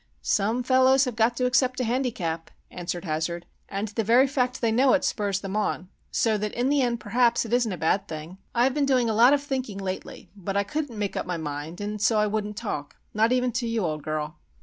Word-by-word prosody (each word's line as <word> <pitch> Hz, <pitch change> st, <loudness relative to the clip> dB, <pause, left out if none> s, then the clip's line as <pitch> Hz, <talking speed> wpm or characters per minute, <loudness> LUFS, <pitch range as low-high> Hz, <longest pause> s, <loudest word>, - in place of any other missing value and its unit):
"Some 220 Hz, +5 st, +1 dB
fellows 260 Hz, +1 st, +4 dB
have 250 Hz, -3 st, -4 dB
got 230 Hz, +1 st, +2 dB
to 250 Hz, -, +1 dB
accept 255 Hz, 0 st, +2 dB
a -, -, +1 dB
handicap," 220 Hz, -10 st, -2 dB, 0.2 s
answered 175 Hz, 0 st, -5 dB
Hazard. 165 Hz, +2 st, -2 dB, 0.2 s
"And 200 Hz, +2 st, -3 dB
the 220 Hz, +2 st, -2 dB
very 240 Hz, +5 st, +5 dB
fact 255 Hz, -2 st, 0 dB
that -, -, -8 dB
they 230 Hz, -2 st, +2 dB
know 255 Hz, +3 st, +4 dB
it 290 Hz, -, +2 dB
spurs 200 Hz, -3 st, 0 dB
them 195 Hz, 0 st, -5 dB
on,—so 210 Hz, +2 st, -1 dB
that 210 Hz, 0 st, -3 dB
in 245 Hz, +2 st, +1 dB
the 285 Hz, -1 st, +3 dB
end, 240 Hz, -2 st, 0 dB
perhaps, 235 Hz, +2 st, +2 dB
it 230 Hz, -, -5 dB
isn't 240 Hz, -3 st, +2 dB
a 185 Hz, -, -4 dB
bad 195 Hz, +5 st, +1 dB
thing. 160 Hz, +4 st, -8 dB, 0.2 s
I've 250 Hz, +2 st, +3 dB
been 285 Hz, -1 st, +1 dB
doing 250 Hz, -4 st, +2 dB
a -, -, 0 dB
lot 240 Hz, +5 st, +6 dB
of 285 Hz, -1 st, +1 dB
thinking 260 Hz, -7 st, -3 dB
lately; 190 Hz, -1 st, -6 dB
but 195 Hz, 0 st, -3 dB
I 200 Hz, -, +3 dB
couldn't 275 Hz, +2 st, -4 dB
make 205 Hz, -2 st, -2 dB
up -, -, -3 dB
my 180 Hz, -1 st, -2 dB
mind 150 Hz, +3 st, -5 dB
and 205 Hz, 0 st, -4 dB
so 220 Hz, +1 st, +3 dB
I 210 Hz, -, +3 dB
wouldn't 210 Hz, 0 st, -2 dB
talk, 145 Hz, -11 st, -4 dB, 0.2 s
not 220 Hz, +2 st, +3 dB
even 250 Hz, 0 st, +2 dB
to 240 Hz, 0 st, -2 dB
you, 230 Hz, -4 st, 0 dB
old 155 Hz, -2 st, -2 dB
girl. 155 Hz, 0 st, -4 dB
220 Hz, 235 wpm, -26 LUFS, 190-250 Hz, 0.2 s, lot